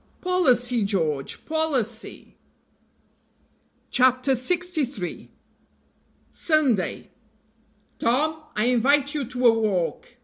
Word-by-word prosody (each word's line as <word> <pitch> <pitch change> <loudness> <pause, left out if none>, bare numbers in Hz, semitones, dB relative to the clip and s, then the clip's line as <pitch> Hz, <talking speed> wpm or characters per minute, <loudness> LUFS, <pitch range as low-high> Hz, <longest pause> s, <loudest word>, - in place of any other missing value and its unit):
"Policy, 250 - +2
George! 160 -9 -2
policy!" 270 -9 -2 1.6
CHAPTER 255 +1 +3
LXIII. 280 - -2 1.0
SUNDAY. 275 - 0 0.9
"TOM, 310 +7 +1
I 215 - +1
invite 270 +4 +2
you 290 -3 -2
to 250 +1 -3
a 235 - +7
walk." 210 0 -2
250 Hz, 75 wpm, -24 LUFS, 225-300 Hz, 1.6 s, a